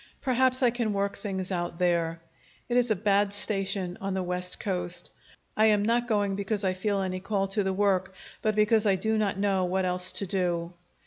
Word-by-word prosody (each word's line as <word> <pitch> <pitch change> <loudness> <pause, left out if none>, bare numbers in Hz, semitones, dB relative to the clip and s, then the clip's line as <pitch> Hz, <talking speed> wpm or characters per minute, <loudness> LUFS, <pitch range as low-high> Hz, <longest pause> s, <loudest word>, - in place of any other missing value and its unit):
Perhaps 260 0 +2
I 245 - +5
can 230 -3 -1
work 200 0 -1
things 195 -2 -4
out 175 -2 -3
there. 170 -2 0 0.5
It 240 - -2
is 245 -1 +3
a 215 - +3
bad 200 0 +1
station 195 -2 -1
on 195 -1 -2
the 190 - -1
West 180 0 0
Coast. 180 -3 -1 0.4
I 220 +1 +4
am 210 -1 +3
not 235 +2 +1
going 205 -3 0
because 200 +1 -2
I 190 -1 +1
feel 195 +1 -1
any 185 0 -3
call 195 +1 -1
to 205 +2 +1
the 190 - 0
work, 190 -1 0 0.3
but 215 -1 0
because 215 0 +3
I 195 - +4
do 220 +4 0
not 200 -3 0
know 195 -2 +1
what 185 +1 0
else 180 0 +2
to 200 - +1
do. 175 -2 -1
195 Hz, 205 wpm, -27 LUFS, 185-210 Hz, 0.5 s, I